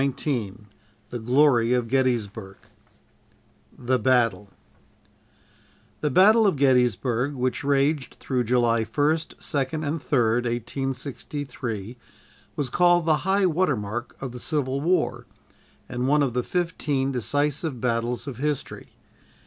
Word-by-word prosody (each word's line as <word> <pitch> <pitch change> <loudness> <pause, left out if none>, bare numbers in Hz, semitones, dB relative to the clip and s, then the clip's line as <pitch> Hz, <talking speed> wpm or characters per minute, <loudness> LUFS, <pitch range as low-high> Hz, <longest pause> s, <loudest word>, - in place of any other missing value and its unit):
_" 135 - +3
CHAPTER 145 +3 -3 0.3
XIX 105 - -20 0.5
THE 120 - -4
GLORY 125 0 +3
OF 125 -2 0
GETTYSBURG 115 -6 -1 1.2
THE 125 +1 0
BATTLE 115 -5 +2 1.5
The 150 - 0
Battle 210 - +5
of 190 - +2
Gettysburg, 125 0 +2
which 130 0 -2
raged 140 0 +1
through 125 -3 -1
July 115 -1 +2
1st, 150 +8 0
2nd 155 +1 -2
and 160 +3 -2
3d, 120 -4 +1
1863, 125 -2 -4 0.6
was 135 -4 -3
called 175 -1 +4
the 155 -2 +3
"high 195 0 +3
water 170 -5 +1
mark" 110 +4 -6
of 135 -2 -5
the 125 - -8
Civil 140 -2 -2
War, 180 +4 0 0.6
and 125 +1 -2
one 150 +1 +3
of 130 -4 -1
the 125 - +1
"fifteen 145 -4 -1
decisive 145 - -1
battles" 120 0 -1
of 135 -5 -6
history. 145 +1 -3
130 Hz, 125 wpm, -25 LUFS, 120-150 Hz, 1.5 s, Battle